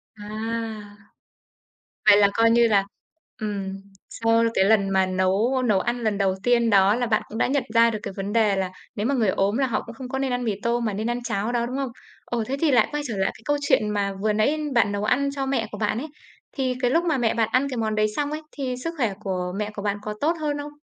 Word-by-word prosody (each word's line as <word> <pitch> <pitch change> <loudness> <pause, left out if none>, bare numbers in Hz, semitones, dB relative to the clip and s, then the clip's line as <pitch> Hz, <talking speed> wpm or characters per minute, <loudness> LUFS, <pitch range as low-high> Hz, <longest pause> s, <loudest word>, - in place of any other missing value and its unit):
À, 205 -1 -10 1.8
vậy 210 -1 +8
là 205 -1 +6
coi 230 0 +4
như 235 0 +5
là, 200 -3 +3 0.6
ừm, 200 -3 -3 0.4
sau 230 0 +2
cái 190 - +3
lần 200 -1 +3
mà 190 -1 +3
nấu 190 +8 +1
nấu 210 -5 +3
ăn 240 +4 -2
lần 215 -2 0
đầu 195 -2 +1
tiên 235 -1 +3
đó 200 0 +5
là 245 +1 0
bạn 215 -2 +2
cũng 220 - -7
đã - - +2
nhận 270 0 +1
ra 230 0 +6
được 215 -2 -3
cái 200 - -5
vấn 200 +1 -3
đề 220 -3 +3
là 190 -1 -2 0.2
nếu 210 - -2
mà 275 +3 +1
người 225 -6 +2
ốm 195 +3 +1
là 270 -1 +2
họ 235 - -1
cũng 230 - -10
không 260 -1 -8
có 265 - -2
nên 265 -2 -1
ăn 245 0 -1
mì 220 -3 0
tôm 235 0 0
mà 215 - -1
nên 215 +4 -2
ăn 240 +1 -2
cháo 220 -1 -2
đó, 240 -1 0
đúng 250 +2 -4
không? 275 -2 -2 0.4
Ồ, 235 -2 -2
thế 265 +5 -3
thì 320 -3 +3
lại 250 - +4
quay 295 0 -2
trở 225 -4 -4
lại 190 - +1
cái - - -17
câu 290 0 +1
chuyện 220 -6 +2
mà 200 -1 -1
vừa 215 0 +1
nãy 220 +9 +2 0.2
bạn 225 -3 +3
nấu 205 0 -2
ăn 270 +6 +2
cho 270 -1 -2
mẹ 265 -5 -1
của 210 - -6
bạn 210 0 0
ấy, 280 +6 -4 0.5
thì 260 -2 0
cái 245 -1 +2
lúc 335 +5 +3
mà 320 -5 +1
mẹ 235 -3 +1
bạn 225 -2 +1
ăn 260 +3 +2
cái 255 - -4
món 220 -1 -1
đấy 215 0 +2
xong 290 0 -1
ấy, 305 +1 -4
thì 260 -3 -3
sức 330 - -3
khỏe 230 -8 0
của 185 -3 -3
mẹ 210 0 -3
của 205 - -5
bạn 205 0 -1
có 210 0 -4
tốt 315 +3 +3
hơn 295 -1 -1
không? 290 0 -6
225 Hz, 270 wpm, -24 LUFS, 205-255 Hz, 1.8 s, vậy